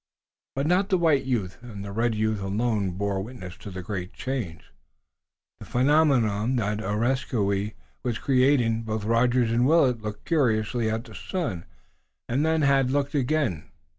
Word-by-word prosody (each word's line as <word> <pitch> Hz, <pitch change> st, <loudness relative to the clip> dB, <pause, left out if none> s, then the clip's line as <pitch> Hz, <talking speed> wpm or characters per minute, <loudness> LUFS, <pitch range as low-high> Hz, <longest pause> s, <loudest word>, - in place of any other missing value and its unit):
But 135 Hz, +1 st, 0 dB
not 185 Hz, +5 st, +2 dB
the 190 Hz, -, +3 dB
white 160 Hz, -6 st, +3 dB
youth 110 Hz, -8 st, -2 dB
and 105 Hz, -5 st, -8 dB
the 100 Hz, -, -6 dB
red 115 Hz, +2 st, 0 dB
youth 110 Hz, -1 st, 0 dB
alone 105 Hz, 0 st, 0 dB
bore 100 Hz, -1 st, -1 dB
witness 95 Hz, -5 st, -8 dB
to 100 Hz, -, -9 dB
the 95 Hz, -1 st, -7 dB
great 95 Hz, -2 st, -5 dB
change, 120 Hz, -, -5 dB, 0.9 s
the -, -, -9 dB
phenomenon 125 Hz, -5 st, +3 dB
even, -, -, +1 dB
that 105 Hz, -3 st, -1 dB
Areskoui 105 Hz, -2 st, 0 dB, 0.3 s
was 120 Hz, -3 st, -2 dB
creating. 125 Hz, -4 st, +3 dB
Both 110 Hz, -1 st, -3 dB
Rogers 120 Hz, +1 st, +2 dB
and 120 Hz, +2 st, +3 dB
Willet 135 Hz, -6 st, +4 dB
had -, -, -18 dB
looked 105 Hz, 0 st, -6 dB
curiously 120 Hz, -6 st, +1 dB
at 110 Hz, +1 st, -2 dB
the 115 Hz, -4 st, -13 dB
sun, 105 Hz, -, -4 dB, 0.6 s
and 130 Hz, +5 st, +1 dB
then 160 Hz, -1 st, +2 dB
had 135 Hz, -2 st, +3 dB
looked 140 Hz, +2 st, 0 dB
again. 135 Hz, -, 0 dB
115 Hz, 165 wpm, -26 LUFS, 105-135 Hz, 0.9 s, Willet